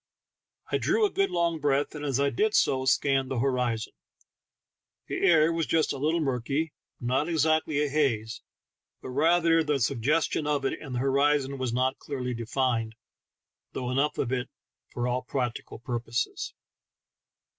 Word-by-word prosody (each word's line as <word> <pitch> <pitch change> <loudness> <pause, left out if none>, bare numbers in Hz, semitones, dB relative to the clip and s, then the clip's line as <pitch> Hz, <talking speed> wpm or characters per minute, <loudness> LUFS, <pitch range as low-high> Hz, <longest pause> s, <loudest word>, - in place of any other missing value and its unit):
I - - +1
drew 445 - +2
a 405 - 0
good 390 +1 +1
long 170 -2 0
breath, 145 -1 +1
and 150 -1 -7
as 140 -3 0
I 140 0 +2
did 215 - +1
so 130 -1 +2
scanned 135 0 +2
the 130 - -2
horizon. 125 -3 0 1.1
The - - -4
air 165 -3 +5
was 165 -2 -1
just 160 -1 +2
a 140 - -6
little 160 +4 +1
murky, 140 +3 -1 0.3
not 130 +6 0
exactly 155 -2 +2
a - - 0
haze, 125 -7 0 0.6
but - - -6
rather 165 +3 +3
the 150 -2 0
suggestion 145 +5 +1
of 145 -2 0
it, - - -1
and 135 -5 -6
the - - 0
horizon 140 0 +2
was 130 -2 -1
not 130 +2 0
clearly 125 -3 -4
defined, 115 -1 -1 0.8
though 125 -1 -3
enough 140 +3 +1
so - - -1 0.6
for 120 0 -2
all 125 +1 0
practical 125 -3 -4
purposes. 120 0 -3
140 Hz, 155 wpm, -27 LUFS, 125-155 Hz, 1.1 s, air